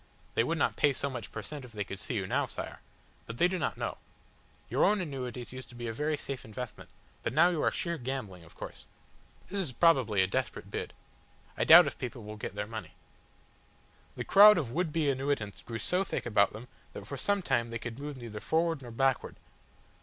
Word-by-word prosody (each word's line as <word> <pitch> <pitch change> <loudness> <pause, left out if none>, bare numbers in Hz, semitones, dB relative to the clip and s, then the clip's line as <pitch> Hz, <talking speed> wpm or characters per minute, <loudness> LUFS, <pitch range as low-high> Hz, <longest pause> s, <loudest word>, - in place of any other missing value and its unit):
They - - +3
would 165 +7 -1
not - - +1
pay 145 -2 +4
so 140 +1 -2
much 120 -4 -6
per 110 - -6
cent, 145 +6 -7
if 125 -2 -12
they 105 -1 -2
could 100 0 -7
see 120 - -4
you 100 -4 -1
now, - - 0
Sire. - - -6 0.5
But 115 - -6
they 175 - +5
do 185 0 -2
not - - -1
know. - - -3 0.7
Your - - +1
own 210 0 +4
annuities 130 -7 -5
used 130 -1 -8
to 120 - -13
be 120 0 -6
a 115 - -3
very 150 +5 -1
safe 140 -2 -5
investment, 125 +1 -7 0.3
but - - -2
now 165 +5 +6
you 160 -4 -1
are - - +4
sheer 170 -2 -2
gambling, 120 -9 -5
of 80 - -17
course. - - -9 0.6
This 200 - -2
is 160 -9 -2
probably 120 - +4
a - - +3
desperate 95 - -3
bid. - - -4 0.6
I - - 0
doubt - - +10
if - - -4
people 120 -2 -5
will 105 +1 -7
get 105 -2 -6
their 105 0 -2
money." 110 0 -7 1.2
The - - -3
crowd 210 +1 +9
of 140 -8 -1
would 165 +3 0
be 155 -1 +1
annuitants 135 -6 -1
grew 115 -1 -5
so 180 - +1
thick 190 - -3
about 100 -4 +3
them 110 +4 -9 0.3
that 100 - -8
for 130 - -5
some 200 +7 0
time 120 -7 +1
they 115 - -3
could 120 +2 -7
move 145 -1 -5
neither 115 -4 -7
forward 165 +3 +1
nor 125 - -9
backward. 135 +2 0
125 Hz, 220 wpm, -31 LUFS, 115-155 Hz, 1.2 s, doubt